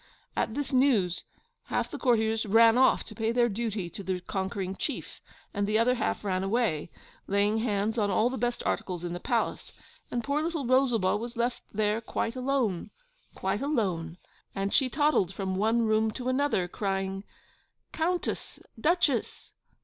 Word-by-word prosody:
At 220 - -1
this 290 -1 -3
news, 230 -10 +3 0.4
half - - -1
the - - -5
courtiers 225 -3 +2
ran 225 +2 +6
off 260 +1 +4
to 220 - -11
pay 220 +1 -1
their 240 0 +3
duty 215 -3 -2
to - - -7
the 185 -1 -2
conquering 190 0 -3
chief, - - -5 0.3
and 200 0 0
the 215 +1 +2
other 235 +3 +4
half 235 -3 -1
ran 185 -2 0
away, 195 -7 0 0.4
laying 205 +2 +2
hands 220 0 0
on 205 -1 +2
all 215 +4 +3
the 255 - -2
best 240 +1 -1
articles 180 -2 -2
in 175 -1 -3
the 175 - -4
palace; 230 +4 -1 0.4
and 240 -1 -2
poor 285 +3 0
little 320 -3 -2
Rosalba 245 -7 +3
was 235 +2 -6
left 240 +1 0
there 210 +1 0
quite 230 +1 -2
alone 250 -8 0 0.5
quite 190 +2 -1
alone; 185 - -1 0.4
and 195 0 -1
she 265 -2 +4
toddled 285 - +2
from 190 -1 -2
one 225 +4 +2
room 220 0 +2
to 250 +3 -4
another, 260 -9 +1
crying, 195 0 -2 0.7
'Countess! 350 +2 -1 0.2
Duchess! 300 -4 +1
220 Hz, 165 wpm, -28 LUFS, 195-250 Hz, 0.7 s, ran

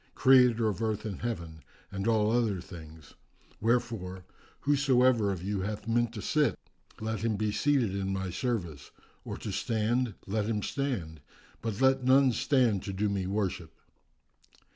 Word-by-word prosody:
Creator 125 -4 +5
of 105 +1 -2
Earth 110 -1 -1
and 100 -4 -5
Heaven 85 -9 -4 0.3
and 100 +2 -3
all 110 -2 +3
other 115 -5 +1
things; 80 -4 -12 0.5
wherefore, 110 -6 -1 0.4
whosoever 130 -6 +3
of 90 -2 -5
you 100 0 -2
hath 105 +1 -4
a 115 - -3
mind 120 0 +2
to 105 - -6
sit 150 -2 +1 0.4
let 110 0 -3
him 115 -1 0
be 105 +1 -1
seated 125 -3 +1
in 95 0 -2
my 95 -1 -3
service, 85 - -3 0.3
or - - -6
to - - -5
stand, 115 0 0
let 105 +1 -1
him 105 -3 -1
stand, 95 - -3 0.4
but 115 -2 -3
let 135 0 +4
none 130 +1 +5
stand 120 -5 +2
to 100 - -5
do 105 +2 0
me 95 -2 -2
worship." 95 -5 -2
110 Hz, 160 wpm, -29 LUFS, 95-120 Hz, 0.5 s, Creator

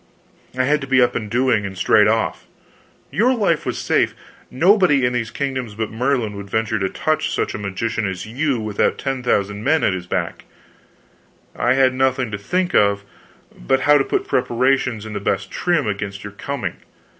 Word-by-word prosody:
I 130 - +2
had 150 +3 +2
to 135 - -6
be 135 0 +3
up 125 0 +4
and 110 -3 -4
doing 120 -2 +2
and 95 -1 -6
straight 105 +3 +4
off. 110 +1 -1 0.6
Your 250 +5 +2
life 195 -8 0
was - - -2
safe - - +1 0.3
nobody 170 - +4
in 125 - 0
these 115 -3 -2
kingdoms 130 -6 -4
but 110 0 -3
Merlin 120 -2 -1
would 100 0 -8
venture 110 0 0
to 95 -1 0
touch 155 +9 -1
such - - -1
a - - -5
magician 105 +2 -2
as 95 -2 -5
you 130 +3 -1
without 110 -2 0
ten 135 -2 -3
thousand 105 -3 0
men 155 +5 +2
at 100 - +2
his 90 -1 -5
back - - -3 1.1
I 120 - +2
had 130 -1 +4
nothing 130 -2 0
to 100 - -4
think 180 - -1
of 100 0 +3 0.5
but 130 - 0
how 145 +2 +5
to - - +3
put - - -2
preparations 125 -2 +1
in 110 - -7
the 100 - -3
best 95 -1 -2
trim 175 -6 0
against 100 -1 -4
your 100 0 -8
coming. 140 +7 -4
120 Hz, 190 wpm, -20 LUFS, 105-135 Hz, 1.1 s, how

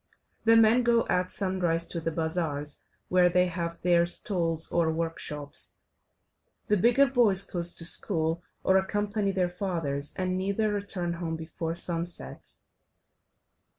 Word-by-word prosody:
The 225 0 +6
men 225 +2 +5
go 235 -1 +2
at 180 0 +1
sunrise 180 -4 0
to 170 - -5
the 165 - -1
bazaars, 160 -3 -1 0.3
where 180 -1 +4
they 180 +1 +3
have 170 -1 -4
their 170 -1 +4
stalls 170 -4 0
or 165 -2 +2
workshops, 160 -3 -1 0.9
the 210 - +4
bigger 240 +8 +4
boys 235 -8 +4
go 175 - -4
to 170 0 -3
school 165 -1 -1 0.2
or 190 - +4
accompany 205 +1 -1
their 185 -2 +1
fathers, 165 -6 -3
and 185 0 -1
neither 200 +3 0
return 195 -4 -3
home 165 -1 -2
before 160 +1 -5
sunset. 170 0 -2
175 Hz, 135 wpm, -28 LUFS, 165-195 Hz, 0.9 s, The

